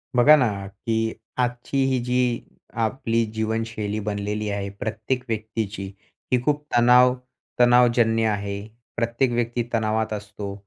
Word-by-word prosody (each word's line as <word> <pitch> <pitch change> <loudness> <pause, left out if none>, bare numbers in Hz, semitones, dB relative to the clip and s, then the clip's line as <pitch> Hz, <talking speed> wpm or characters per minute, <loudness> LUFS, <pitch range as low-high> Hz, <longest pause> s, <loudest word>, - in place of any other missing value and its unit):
बघा 135 +5 +8
ना, 105 -8 0
की 110 +2 -2 0.3
आजची 125 +2 0
ही 130 - +2
जी 125 -1 0 0.4
आपली 115 -1 0
जीवनशैली 110 -1 -2
बनलेली 105 0 -3
आहे 100 -1 -3
प्रत्येक 110 +4 -3
व्यक्तीची. 110 -3 -3 0.5
ही 125 - +3
खूप 150 0 +1
तणाव 125 +1 +6 0.5
तणावजन्य 120 -2 +4
आहे. 100 -1 -2 0.4
प्रत्येक 120 +2 +1
व्यक्ती 120 0 -1
तणावात 110 -1 0
असतो 105 -1 -6
115 Hz, 120 wpm, -24 LUFS, 105-120 Hz, 0.5 s, बघा